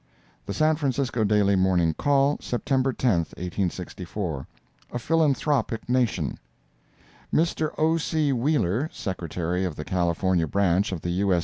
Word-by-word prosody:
The - - -2
San 155 0 +3
Francisco 135 -5 0
Daily 100 -1 +3
Morning 90 -3 +2
Call, 140 - +2
September 130 +2 0
10, 120 -8 +1 0.2
1864 90 -3 -4 0.5
A - - -1
PHILANTHROPIC 145 -4 +1
NATION 120 - 0 0.9
Mr. 160 -1 +1
O. 160 +1 +3
C. 155 -3 0
Wheeler, 130 - +1
Secretary 90 -1 -3
of 90 -5 -2
the 75 - -6
California 90 -1 +1
Branch 95 +3 +2
of 90 -4 -4
the 85 - -2
U.S. 95 0 +2
100 Hz, 125 wpm, -25 LUFS, 90-140 Hz, 0.9 s, San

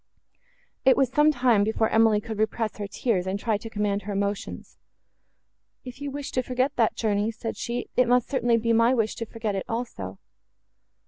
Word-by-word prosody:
It 265 - +5
was 265 -3 +2
some 300 +2 +5
time 245 -6 +3
before 220 +1 +1
Emily 225 -1 +4
could 215 0 -6
repress 220 0 -1
her 205 -1 -4
tears, 200 -3 -1
and 190 +1 -1
try 215 -2 0
to 225 - -8
command 205 -2 -1
her 205 +1 -5
emotions. 200 0 -4 1.1
"If 250 +2 -9
you 285 - -3
wish 285 0 -6
to 255 - 0
forget 255 +2 -1
that 230 -3 +2
journey," 210 -1 0
said 225 0 -5
she, 240 +1 -4
"it 250 -1 +4
must 245 0 +3
certainly 240 -4 +2
be 230 0 +1
my 230 +3 +4
wish 220 -3 0
to 230 - -4
forget 225 -2 -3
it 195 - -2
also." 165 - -4
225 Hz, 190 wpm, -26 LUFS, 210-245 Hz, 1.1 s, It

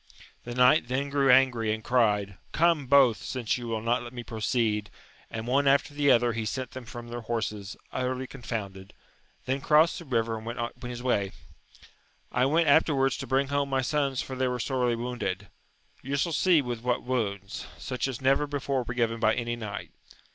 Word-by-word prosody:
The 120 0 -6
knight 125 +2 +5
then 135 +3 -2
grew 140 -1 +2
angry, 125 -4 +4
and 110 0 -3
cried. 105 -6 +1 0.2
Come 165 -4 +2
both, 135 -4 +6
since 125 -2 -2
you 120 - -6
wiU 110 -1 -2
not 120 +2 +1
let 120 +1 -9
me 120 -1 -6
proceed! 110 -2 -1 0.4
and 110 0 -5
one 140 +3 +2
after 140 +1 +3
the 145 -1 +2
other 120 -2 +4
he 115 0 -2
sent 125 +4 -4
them 130 -1 -8
from 120 0 -9
their 120 0 -5
horses, 110 -3 -4 0.2
utterly 130 0 -2
confounded; 100 -7 -6 0.5
then 135 +2 -1
crossed 155 +3 +4
the 170 - -10
river 115 -4 0
and 110 - -12
went 120 +1 -5 0.2
his 120 -1 -6
way. 100 -6 0 1.0
I 125 +1 +2
went 160 +3 +2
after 150 +1 +4
wards 135 -1 +2
to 135 - -6
bring 135 +2 +1
home 140 0 0
my 135 -1 +1
sons 140 -1 0
for 130 - -6
they 130 0 0
were 125 0 -2
sorely 125 -1 0
wounded: 115 -6 -4 0.5
you 135 +2 -3
shall 165 +4 0
see 170 -3 +4
with 120 -2 -4
what 125 0 0
wounds, 100 -6 -3
such 125 +1 -3
as 130 -3 -4
never 135 +2 +2
before 140 -2 -1
were 125 0 -5
given 115 -1 0
by 110 -1 +3
any 120 -1 -2
knight. 110 -3 -6
125 Hz, 195 wpm, -28 LUFS, 115-135 Hz, 1.0 s, both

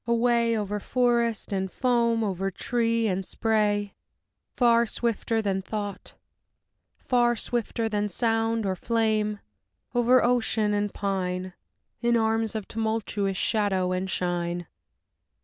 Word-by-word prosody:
Away, 235 -1 +2
over 210 0 -2
forest 235 -2 0
and 190 -1 -2
foam, 235 -3 +1
over 195 -2 -1
tree 230 +3 0
and 190 -2 0
spray, 205 -1 0 0.6
Far 235 -1 +4
swifter 225 0 -1
than 195 -2 0
thought, 205 0 -6 0.8
far 240 -1 +2
swifter 230 0 -1
than 210 -1 -1
sound 225 +1 0
or 190 - +1
than 185 - -13
flame; 215 -2 +1 0.5
Over 245 +1 +4
ocean 225 -3 +2
and 205 0 0
pine, 185 -2 -2 0.5
In 235 0 +3
arms 225 0 0
of 215 -3 -4
tumultuous 220 -3 -1
shadow 195 -5 +1
and 185 +1 -2
shine. 175 -1 -2
220 Hz, 120 wpm, -26 LUFS, 195-235 Hz, 0.8 s, Far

